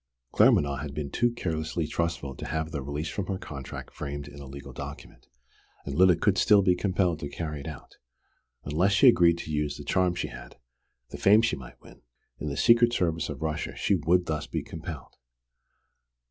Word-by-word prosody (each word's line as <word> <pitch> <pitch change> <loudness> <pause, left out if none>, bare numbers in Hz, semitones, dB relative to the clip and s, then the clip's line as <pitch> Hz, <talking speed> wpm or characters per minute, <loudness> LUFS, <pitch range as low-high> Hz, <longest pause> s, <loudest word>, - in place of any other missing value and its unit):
Claremanagh 70 -1 +4
had 70 -2 -6
been 75 -2 -4
too 120 - +2
carelessly 80 -7 -3
trustful 80 -3 -2
to - - -7
have 80 +1 -2
the 70 -4 -3
release 70 +4 -4
from 100 -4 -4
her 95 - -2
contract 70 -7 -8
framed 70 0 -6
in 70 0 -11
a 70 - -9
legal 70 0 -9
document, - - -9 0.6
and 70 - -4
Lyda 90 +4 +5
could 95 +3 +1
still 105 -1 +5
be 90 -2 +4
compelled 90 -3 0
to 70 - -5
carry 75 0 -5
it 70 - -8
out. 75 -4 -10 0.7
Unless 90 +7 +1
she 115 +7 +6
agreed 85 -8 +6
to 80 - -6
use 75 -1 -1
the - - -8
charm 90 -2 +1
she - - -3
had, - - -11 0.5
the - - -7
fame 105 +3 +6
she 120 - +1
might 65 -3 -12
win, - - -16 0.4
in 75 - -3
the 70 - -4
secret 120 +4 +5
service 85 -6 0
of - - -5
Russia, 80 -1 -3
she - - +1
would 90 0 +3
be - - -16
thus 75 -2 -3 0.2
compelled! - - -8
80 Hz, 195 wpm, -27 LUFS, 70-95 Hz, 0.7 s, she